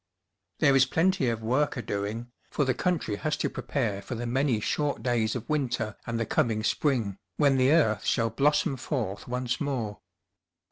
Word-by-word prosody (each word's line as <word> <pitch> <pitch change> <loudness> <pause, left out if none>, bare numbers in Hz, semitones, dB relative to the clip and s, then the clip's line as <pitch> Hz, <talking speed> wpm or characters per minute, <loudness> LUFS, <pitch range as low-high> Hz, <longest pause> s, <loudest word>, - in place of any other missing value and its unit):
There 140 -3 +4
is 135 0 +5
plenty 165 -3 +2
of 115 -1 -3
work 130 +6 +1
a - - -2
doing, 105 +4 -4 0.2
for 145 - 0
the 130 - +2
country 160 - -1
has 155 +5 -1
to - - -1
prepare 110 -8 -2
for 120 - -6
the 120 +1 -4
many 125 -1 +1
short 145 +6 -1
days 115 -3 +1
of 120 - -5
winter 125 -8 -1
and 115 -1 -2
the 115 - 0
coming 110 0 +1
spring, 110 -7 0 0.2
when 140 -3 +4
the 130 0 +4
earth 110 - +3
shall 115 -1 +1
blossom 150 - +2
forth 120 -7 -3
once 125 0 -2
more. 120 -8 -2
125 Hz, 180 wpm, -28 LUFS, 110-140 Hz, 0.2 s, is